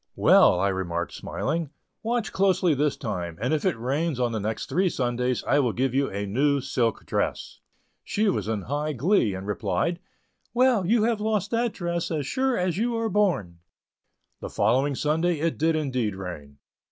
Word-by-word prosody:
"Well," 90 - +5
I 100 +2 +2
remarked, 85 -4 -3
smiling, 160 +1 -3 0.3
"watch 230 0 -2
closely 190 -3 +3
this 145 +1 0
time, 90 -7 -4
and 125 +7 0
if 155 - 0
it 185 - +1
rains 140 +4 -1
on 120 -1 +1
the 110 - -2
next 110 +2 -3
three 185 +1 +1
Sundays 125 -2 -1
I 145 - +2
will 125 -6 +1
give 130 0 0
you 135 +1 +1
a 100 +1 -3
new 140 +8 +2
silk 120 -4 -1
dress." - - -2 0.4
She 215 +1 0
was 190 - 0
in 110 -3 -2
high 150 +3 -2
glee, 135 - +2
and 95 +1 -6
replied: 105 - -1 0.6
"Well, 245 -7 +3
you 225 +1 +3
have 225 -2 +1
lost 210 -2 0
that 235 -1 0
dress, 170 -2 -2
as 150 -4 -2
sure 260 - 0
as 180 0 0
you 235 +1 0
are 225 0 -1
born." 165 - 0 0.8
The - - -6
following 135 +4 +1
Sunday 160 +4 0
it 165 +1 -1
did 160 +1 +2
indeed 130 -9 -1
rain. 80 -7 -8
145 Hz, 180 wpm, -25 LUFS, 110-185 Hz, 0.8 s, Well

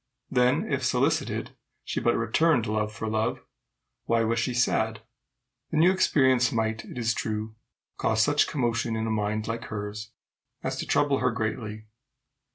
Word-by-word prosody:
Then 125 -1 +3
if, - - -1
solicited, - - 0 0.3
she - - -2
but 120 - +2
returned 120 +3 +2
love 110 0 -1
for 110 +1 -5
love, 110 0 0 0.7
why 115 -1 +2
was 115 0 +1
she 125 - 0
sad? 110 -3 +1 0.7
The 160 - -2
new 170 +4 +6
experience 130 -9 +3
might, 110 -1 -1
it - - -10
is 115 -1 +1
true, 110 0 -3 0.4
cause 110 0 +2
such 145 0 +3
commotion 120 -3 -1
in 110 0 -1
a 110 - -1
mind 105 0 -1
like 115 0 -3
hers 105 0 -5 0.5
as - - -2
to - - -4
trouble 140 -2 +2
her 125 - +2
greatly. 110 -1 -4
115 Hz, 160 wpm, -27 LUFS, 110-125 Hz, 0.7 s, new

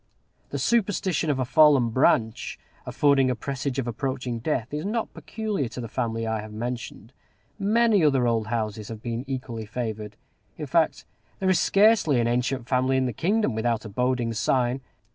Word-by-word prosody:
The - - -3
superstition 190 -7 +1
of 145 - +1
a 130 - 0
fallen 140 -4 +5
branch 110 -2 +1 0.3
affording 140 -3 +3
a 125 - 0
presage 135 +2 -4
of 135 - -1
approaching 125 0 -3
death 120 -1 -2
is 150 +1 -2
not 220 +3 -2
peculiar 210 - -3
to 125 - -8
the 120 - -4
family 115 0 -2
I 110 -1 -1
have 110 0 -9
mentioned. 120 0 -6 0.5
Many 215 -1 +3
other 135 -4 +3
old 115 -2 0
houses 110 -2 -3
have 110 -1 -8
been 120 0 -3
equally 125 -5 -5
favored: 110 -2 -5 0.4
in - - -4
fact, - - +1 0.3
there 190 -1 +1
is 185 - +3
scarcely 195 - +4
an 120 - +1
ancient 125 +1 -1
family 130 0 +2
in 130 - +1
the 125 - -2
kingdom 195 - +1
without 115 +1 -1
a - - -6
boding 125 +1 0
sign. 125 +3 +1
125 Hz, 175 wpm, -25 LUFS, 115-150 Hz, 0.5 s, fallen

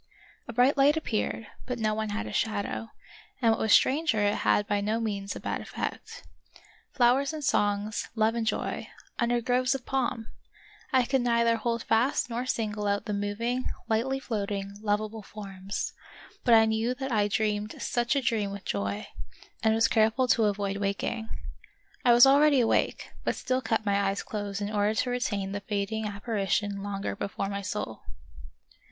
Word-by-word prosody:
A 235 - -6
bright 250 +5 +4
light 285 +3 +5
appeared, 225 -5 -2 0.2
but 250 -1 -2
no 215 -2 +1
one 220 0 -2
had 210 +2 -3
a - - -6
shadow, 220 +1 -1 0.5
and 230 -3 +4
what 225 - 0
was 220 - +1
stranger 285 -2 +4
it 205 - +2
had 205 - +2
by 205 0 0
no 215 +3 0
means 205 -3 -3
a - - -5
bad - - -3
effect. - - -6 0.7
Flowers 265 +3 +3
and 310 -1 -5
songs, 205 -3 0
love 220 0 +3
and 230 -1 -2
joy, - - -2 0.3
under 240 0 +2
groves 250 +2 +2
of 260 - -6
palm! 250 -4 -1 0.7
I 260 -3 +4
could 265 +1 +1
neither 235 -1 +3
hold 230 +1 -2
fast 240 +2 +1
nor 245 +2 -2
single 210 -3 -1
out 200 0 0
the 210 - -2
moving, 220 +5 -1 0.2
lightly 250 +5 0
float 215 -6 -3
ing, 200 -1 -4
lovable 215 +1 -1
forms; 195 -1 -6 0.5
but 240 -3 +6
I 225 0 +7
knew 220 +3 0
that 265 0 -4
I 210 -3 +3
dreamed 210 0 -1
such 240 +2 0
a 275 - +1
dream 220 -3 +1
with 200 0 -8
joy, 100 0 -2 0.6
and 220 0 +3
was 225 0 +4
careful 225 +3 +3
to 225 -2 +4
avoid 200 -1 -1
waking. 200 +3 -2 0.7
I 240 - +6
was 240 +2 +9
already 285 +1 +6
awake, 235 - +1
but - - 0
still 255 0 -1
kept 225 -2 -1
my 200 0 +2
eyes 195 0 -1
closed 205 -4 -4
in 205 - -3
order 210 +1 +1
to 245 +3 0
retain 205 -6 -1
the 205 - -3
fading 205 +2 -2
appari 205 -1 -3
tion 200 0 0
longer 200 0 -3
before 200 0 -3
my 200 0 -3
soul. 200 - -4
220 Hz, 180 wpm, -28 LUFS, 205-240 Hz, 0.7 s, was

